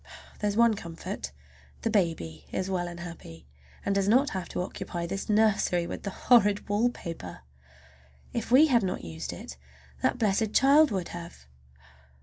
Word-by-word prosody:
There's 205 0 -1
one 235 -1 +5
comfort, 185 0 -6 0.5
the 225 - 0
baby 150 - -1
is 190 +1 -2
well 175 -2 -1
and 170 0 -8
happy, 85 - -10 0.4
and 200 - +1
does 195 0 +1
not 260 +7 +4
have 185 -2 -4
to - - -2
occupy 180 -2 -5
this 195 +4 -4
nursery 210 -5 +3
with - - -6
the 200 - -4
horrid 205 -1 +3
wallpaper. 200 - -2 0.9
If 235 - -3
we 265 +6 +7
had 250 -6 +3
not 185 -2 -2
used 80 -1 -6
it 70 - -9 0.4
that - - +1
blessed 215 -1 +1
child 290 +3 +6
would 190 -4 -3
have! 170 - -9
195 Hz, 155 wpm, -28 LUFS, 170-220 Hz, 0.9 s, we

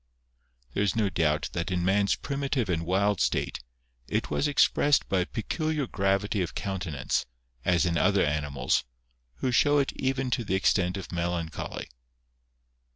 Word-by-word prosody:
There - - 0
is 100 -3 +1
no 110 -3 +2
doubt 75 -2 +1
that 85 +1 -2
in 90 -1 0
man's 100 +1 +3
primitive 140 -5 -2
and 85 -2 -1
wild 100 +1 +2
state, - - 0 0.5
it - - -2
was 150 - +1
expressed 145 0 +3
by 95 - +1
a 90 - +1
peculiar 155 +5 -2
gravity 100 -1 0
of 85 - -3
countenance, 90 -9 -2 0.4
as 90 +3 +3
in 85 -1 +1
other 100 0 +3
animals, 75 -2 0 0.5
who 125 - -1
show 145 +4 +4
it 140 -1 +1
even 130 -1 -1
to 120 -1 0
the 95 -3 -1
extent 95 -1 +2
of 95 - -7
melancholy. 85 -2 -3
95 Hz, 155 wpm, -28 LUFS, 85-125 Hz, 0.5 s, show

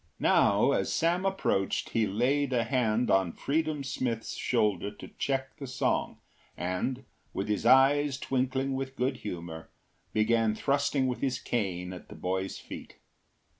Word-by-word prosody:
Now - - +4
as - - 0
Sam 175 +3 +1
approached 145 - 0
he 110 -2 +2
laid 130 +6 +1
a 120 -2 +2
hand 120 -1 +1
on 95 -3 +3
Freedom 155 0 -1
Smith’s 120 -4 -2
shoulder 105 -1 +1
to 105 - -11
check 135 -1 -1
the 140 - -6
song, 125 - 0 0.4
and, 95 +9 -2 0.3
with 95 - -2
his 105 +2 0
eyes 135 +2 +5
twinkling 130 +1 -1
with 135 0 -4
good 130 0 0
humour, 85 -5 -7 0.4
began 110 0 +2
thrusting 140 +1 +1
with 125 -1 -2
his 130 -2 0
cane 95 -8 -2
at 90 - -11
the - - -10
boy’s 95 +1 -2
feet. - - -9
125 Hz, 145 wpm, -29 LUFS, 105-135 Hz, 0.4 s, eyes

